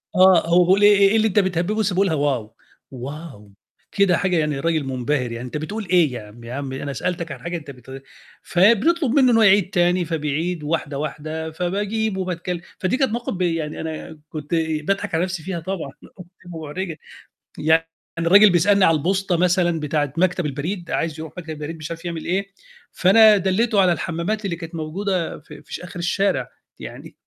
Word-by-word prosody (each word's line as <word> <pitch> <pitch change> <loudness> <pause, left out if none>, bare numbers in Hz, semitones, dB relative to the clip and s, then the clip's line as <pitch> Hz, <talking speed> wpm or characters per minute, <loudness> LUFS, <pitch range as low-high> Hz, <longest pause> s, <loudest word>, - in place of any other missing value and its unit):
آه، 185 -2 +6
هو 175 +1 +5
بيقول 190 +3 +4
لي 205 - +5
إيه 200 -1 +6
إيه 220 - +1
اللي 220 0 +3
أنت 205 0 +2
بتهبِّبه 185 +1 0
بس 205 -3 +1
بيقولها 185 -3 +2
wow! 135 -7 -1 0.5
wow! 140 -1 -8 0.5
كده 195 -4 +3
حاجة 180 -3 +1
يعني 150 -3 0
راجل 160 -1 0
منبهر 130 -1 -2
يعني 120 +2 -6
أنت 125 - -5
بتقول 205 +7 -5
إيه؟ 170 -7 +3
ياعمي، 115 +1 -10
يا 120 - -6
عمي 135 -1 -5
أنا 140 -1 -4
سألتك 170 +1 -3
عن - - -7
حاجة 170 0 -4
أنت 145 -3 -9
بت 130 +1 -11 0.4
فبنطلب 230 - +3
منه 260 -3 +4
إنه 225 - +4
هو 225 - +5
يعيد 195 -2 +5
تاني 175 -1 +2
فبيعيد 160 +1 -2
واحدة، 145 -2 -2
واحدة 155 +2 -4
فباجيب 200 +5 -2
وباتكلم. 180 -1 -3 0.2
فدي 190 +7 0
كانت 265 -5 +1
مواقف 235 -1 -3
ب 185 - -5
يعني 165 -3 -1
أنا 160 -1 -7
كنت 155 +1 -4
باضحك 160 +4 -1
على 165 - +1
نفسي 185 -3 -4
فيها 180 -2 -4
طبعًا، 165 -5 -5
بتبقى 180 - -13 0.3
محرجة. 165 +2 -5 0.6
يعني 160 +1 +3 0.3
الرجل 200 +5 +7
بيسألني 185 +3 +4
على 165 -1 +4
البوسطة 185 +2 0
مثلًا 175 -2 +2
بتاعة 145 -2 -1
مكتب 180 -1 +1
البريد، 170 +6 -4
عايز 160 -1 -2
يروح 160 -1 -7
مكتب 165 -2 -8
البريد 155 +2 -6
مش 155 +1 -7
عارف 165 +1 -7
يعمل 165 -2 -5
إيه، 195 +3 -1 0.4
فأنا 210 +3 +6
دلّيته 195 +3 +2
على 185 - +4
الحمَّامات 170 +6 -2
اللي 170 -3 -2
كانت 165 0 -9
موجودة 175 +3 -2
في 150 +1 -14
ش - - -1
في - - -12
آخر 180 0 -8
الشارع. 195 +3 0 0.3
يعني - - -10
170 Hz, 190 wpm, -22 LUFS, 155-190 Hz, 0.6 s, الرجل